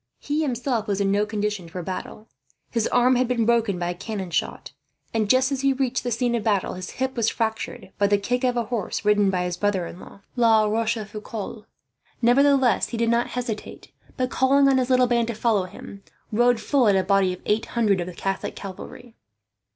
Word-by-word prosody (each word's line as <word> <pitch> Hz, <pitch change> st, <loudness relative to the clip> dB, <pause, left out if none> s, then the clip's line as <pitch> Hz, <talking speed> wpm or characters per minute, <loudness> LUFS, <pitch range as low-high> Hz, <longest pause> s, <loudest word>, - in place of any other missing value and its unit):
He 295 Hz, +2 st, -2 dB
himself 245 Hz, -5 st, -1 dB
was 200 Hz, -1 st, -1 dB
in 195 Hz, -1 st, +1 dB
no 205 Hz, +1 st, +1 dB
condition 210 Hz, -4 st, -3 dB
for 180 Hz, +1 st, -6 dB
battle. 190 Hz, +4 st, -6 dB, 0.4 s
His 230 Hz, -2 st, 0 dB
arm 250 Hz, +1 st, +3 dB
had 250 Hz, 0 st, +2 dB
been 235 Hz, -2 st, +1 dB
broken 230 Hz, -4 st, +2 dB
by 175 Hz, 0 st, -2 dB
a -, -, -3 dB
cannon 190 Hz, 0 st, -6 dB
shot 150 Hz, -, -2 dB, 0.4 s
and, 220 Hz, -2 st, 0 dB
just 260 Hz, +3 st, +3 dB
as 270 Hz, -1 st, -1 dB
he 275 Hz, -1 st, +3 dB
reached 260 Hz, -1 st, -1 dB
the 245 Hz, -, -2 dB
scene 240 Hz, +1 st, 0 dB
of 235 Hz, -3 st, -1 dB
battle, 200 Hz, -3 st, 0 dB
his 185 Hz, 0 st, -7 dB
hip 260 Hz, 0 st, -1 dB
was 230 Hz, -2 st, +2 dB
fractured 220 Hz, -2 st, -3 dB
by 200 Hz, -, +4 dB
the 205 Hz, 0 st, +3 dB
kick 245 Hz, +6 st, -2 dB
of 250 Hz, -1 st, +1 dB
a 235 Hz, -, +1 dB
horse 215 Hz, -3 st, -3 dB
ridden 210 Hz, -1 st, +4 dB
by 180 Hz, -1 st, 0 dB
his 180 Hz, 0 st, -3 dB
brother 200 Hz, -2 st, 0 dB
in 170 Hz, -, -9 dB
law, 200 Hz, -, -13 dB
La 225 Hz, -3 st, +4 dB
Rochefoucault. 215 Hz, 0 st, -3 dB, 0.5 s
Nevertheless 260 Hz, -1 st, +3 dB
he 235 Hz, -, -4 dB
did 230 Hz, 0 st, +1 dB
not 235 Hz, +1 st, +2 dB
hesitate 235 Hz, -4 st, -5 dB, 0.3 s
but, 255 Hz, 0 st, -1 dB
calling 275 Hz, +1 st, +4 dB
on 270 Hz, -1 st, +4 dB
his 250 Hz, 0 st, -1 dB
little 255 Hz, -1 st, +4 dB
band 235 Hz, -1 st, +1 dB
to 235 Hz, -, -3 dB
follow 215 Hz, -4 st, +1 dB
him, 195 Hz, +2 st, -11 dB, 0.3 s
rode 240 Hz, +2 st, +3 dB
full 250 Hz, +2 st, +2 dB
at 200 Hz, -, +4 dB
a 190 Hz, -, +2 dB
body 195 Hz, -1 st, +2 dB
of 180 Hz, -, -6 dB
eight 215 Hz, +2 st, 0 dB
hundred 205 Hz, -5 st, +3 dB
of 175 Hz, -, -4 dB
the 180 Hz, -, -8 dB
Catholic 195 Hz, +2 st, -3 dB
cavalry. 225 Hz, +5 st, -9 dB
225 Hz, 215 wpm, -24 LUFS, 200-245 Hz, 0.5 s, by